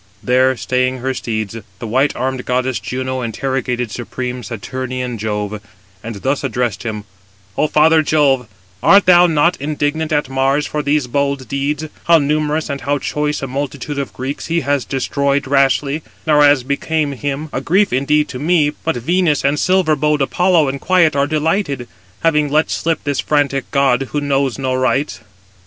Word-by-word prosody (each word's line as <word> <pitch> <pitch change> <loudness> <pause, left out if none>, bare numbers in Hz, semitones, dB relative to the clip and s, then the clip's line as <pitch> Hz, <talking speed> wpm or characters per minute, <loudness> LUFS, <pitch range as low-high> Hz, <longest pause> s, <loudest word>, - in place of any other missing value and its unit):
There 130 +1 +3
staying 130 +1 0
her 130 +1 -2
steeds, 110 -4 -3 0.2
the 115 - -7
white 130 +6 +1
armed 130 -1 -2
goddess 125 -2 -1
Juno 130 +5 -3
interrogated 125 0 -2
supreme 125 +2 -5
Saturnian 125 +2 -5
Jove, 105 -1 -3 0.4
and 115 0 -6
thus 135 +8 -1
addressed 120 -4 -1
him: 110 -3 -4 0.5
"O 155 - +2
father 155 +1 +4
Jove, 140 -5 +2 0.3
art 200 0 +6
thou 180 -1 +7
not 165 0 +2
indignant 155 +2 -1
at 150 -2 +1
Mars 135 +2 +1
for 150 - -2
these 145 -1 +1
bold 140 +1 -1
deeds,—how 150 +4 0
numerous 150 +1 0
and 140 -2 -4
how 145 +1 0
choice 150 0 -2
a - - -2
multitude 140 +2 -4
of 140 - -4
Greeks 130 +3 -5
he 170 0 0
has 140 -3 0
destroyed 140 +1 0
rashly, 140 +2 +2 0.2
nor 150 -2 +4
as 145 -3 +5
became 145 +2 -1
him: 145 +3 -4
a - - -2
grief 195 +1 +2
indeed 150 +3 +2
to 125 - -6
me; 155 -1 +2
but 165 +2 -3
Venus 160 +3 +1
and 145 +1 +2
silver 185 -4 +2
bowed 150 0 +1
Apollo 175 +1 +2
in 140 +1 -4
quiet 170 -4 +3
are 140 0 +2
delighted, 155 -4 -1 0.4
having 150 -3 +2
let 155 +2 +1
slip 165 0 -1
this 145 -2 -1
frantic 140 -2 0
[god], 135 -2 +2
who 145 - +1
knows 140 -3 0
no 130 -1 -1
rights. 130 +1 0
140 Hz, 165 wpm, -17 LUFS, 130-150 Hz, 0.5 s, thou